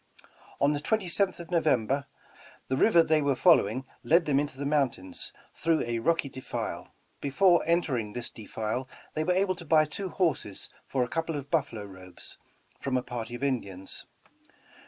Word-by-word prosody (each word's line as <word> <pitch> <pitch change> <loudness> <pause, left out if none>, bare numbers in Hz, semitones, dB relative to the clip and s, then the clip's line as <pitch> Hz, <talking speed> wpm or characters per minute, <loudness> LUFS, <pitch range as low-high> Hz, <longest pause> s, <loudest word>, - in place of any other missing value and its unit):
On 140 +1 +4
the 145 - -1
27th 190 +1 +1
of 170 -1 -9
November, 140 -5 +2 0.6
the 130 - +1
river 170 +3 +5
they 155 -1 +3
were 140 -2 +2
following 125 +1 +4 0.2
led 170 +1 +4
them 140 -2 +3
into 145 -2 -3
the 140 - -4
mountains, 135 -10 -1 0.2
through 165 -1 +1
a 120 -1 -2
rocky 165 +4 +1
defile. 130 -1 -5 0.2
Before 175 +5 +4
entering 130 -11 +1
this 120 -1 -3
defile 110 +3 -4 0.2
they 155 - 0
were 180 - +1
able 190 +1 +2
to 180 -1 -10
buy 155 -1 +4
two 185 +6 -5
horses 160 - -1 0.2
for 130 -2 +1
a - - -2
couple 165 +1 -2
of 140 -1 -6
buffalo 140 -10 0
robes, 95 -2 -11 0.4
from 130 -2 0
a 125 - -1
party 120 -1 -5
of 120 - -7
Indians. 100 -9 -3
140 Hz, 165 wpm, -29 LUFS, 120-165 Hz, 0.6 s, river